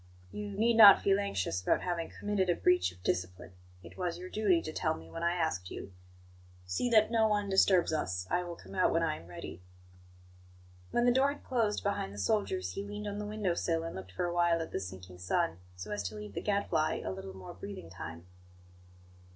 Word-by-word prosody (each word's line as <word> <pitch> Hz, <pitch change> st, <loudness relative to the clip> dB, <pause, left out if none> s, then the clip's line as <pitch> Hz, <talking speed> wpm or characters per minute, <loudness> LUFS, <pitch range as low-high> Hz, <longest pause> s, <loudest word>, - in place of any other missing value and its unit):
"You 210 Hz, 0 st, -5 dB
need 230 Hz, +1 st, +3 dB
not 205 Hz, -3 st, +11 dB
feel 195 Hz, 0 st, +3 dB
anxious 95 Hz, -, -1 dB
about -, -, +1 dB
having 170 Hz, -2 st, -2 dB
committed 205 Hz, -3 st, -1 dB
a 175 Hz, -, +3 dB
breach 180 Hz, -, +3 dB
of 90 Hz, 0 st, -19 dB
discipline; 90 Hz, 0 st, -2 dB, 0.3 s
it 85 Hz, +1 st, -13 dB
was 175 Hz, -2 st, -2 dB
your 185 Hz, +1 st, -8 dB
duty 200 Hz, -5 st, +3 dB
to 155 Hz, -, -5 dB
tell -, -, 0 dB
me 80 Hz, 0 st, -12 dB
when 165 Hz, -, -6 dB
I 170 Hz, +1 st, +1 dB
asked 160 Hz, -, -1 dB
you. 95 Hz, -, -8 dB, 0.7 s
See 90 Hz, -, -1 dB
that 215 Hz, -1 st, +5 dB
no 225 Hz, -1 st, +4 dB
one 205 Hz, -1 st, 0 dB
disturbs 190 Hz, -3 st, +4 dB
us. 90 Hz, -12 st, -1 dB
I 180 Hz, -, +2 dB
will 175 Hz, -1 st, -6 dB
come -, -, -13 dB
out 185 Hz, -1 st, +3 dB
when 165 Hz, -, +2 dB
I 155 Hz, -2 st, 0 dB
am 85 Hz, -, -13 dB
ready." 90 Hz, 0 st, -8 dB, 1.3 s
When 240 Hz, -, +1 dB
the 245 Hz, -, +6 dB
door 270 Hz, +2 st, +4 dB
had 290 Hz, -, -15 dB
closed 225 Hz, -5 st, 0 dB
behind 200 Hz, -, -2 dB
the -, -, -10 dB
soldiers, 220 Hz, -, 0 dB
he 195 Hz, -, -4 dB
leaned 205 Hz, +1 st, -6 dB
on 205 Hz, 0 st, -4 dB
the 210 Hz, -, -4 dB
window 210 Hz, -4 st, -1 dB
sill 165 Hz, -1 st, -1 dB
and 165 Hz, -, -5 dB
looked 95 Hz, 0 st, -8 dB
for 175 Hz, -, -1 dB
a 175 Hz, -, -2 dB
while 170 Hz, -1 st, +3 dB
at 165 Hz, -, -5 dB
the -, -, -2 dB
sinking 90 Hz, -1 st, -9 dB
sun, 90 Hz, -1 st, 0 dB, 0.2 s
so 90 Hz, +4 st, -7 dB
as 105 Hz, 0 st, -2 dB
to 105 Hz, -, -11 dB
leave 105 Hz, -1 st, -8 dB
the -, -, -3 dB
Gadfly 200 Hz, -6 st, 0 dB
a -, -, -2 dB
little 95 Hz, 0 st, -7 dB
more 95 Hz, -, -9 dB
breathing 90 Hz, -2 st, -8 dB
time. 85 Hz, -1 st, -8 dB
170 Hz, 220 wpm, -32 LUFS, -, 1.3 s, not